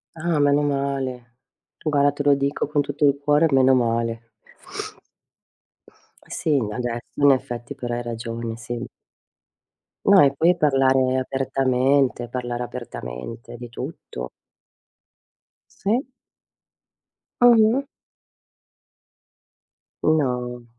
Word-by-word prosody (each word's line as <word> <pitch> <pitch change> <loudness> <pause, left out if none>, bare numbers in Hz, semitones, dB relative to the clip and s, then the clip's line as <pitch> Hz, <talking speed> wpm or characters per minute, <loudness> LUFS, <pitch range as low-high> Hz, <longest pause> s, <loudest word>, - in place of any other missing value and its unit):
Ah, 165 -1 -1
meno 145 0 +3
male, 135 -4 -3 0.5
guarda 145 -2 +3
te 145 0 -4
lo 145 0 +5
dico 140 +1 -1
con 150 0 +1
tutto 145 +1 -1
il 140 0 +3
cuore, 150 +2 +4
meno 130 -1 +5
male. 115 -1 -1 2.0
Sì, - - -4 0.2
adesso 120 +1 -3 0.2
in 140 0 +7
effetti, 120 -2 -3
però 120 -1 -4
hai 120 - -3
ragione, 115 -1 -5
sì. 120 +1 -5 1.2
No, 200 -1 +7
e 140 -1 +5
poi 170 +6 +3
parlare 135 -4 +3
apertamente, 130 -1 +1
parlare 120 -1 -3
apertamente 115 - -8
di 120 +1 -8
tutto. 115 - -7 1.5
Sì. 235 +7 0 1.3
Mh-mh. 235 +2 +5 2.2
No. 125 -5 0
130 Hz, 95 wpm, -23 LUFS, 120-145 Hz, 2.2 s, in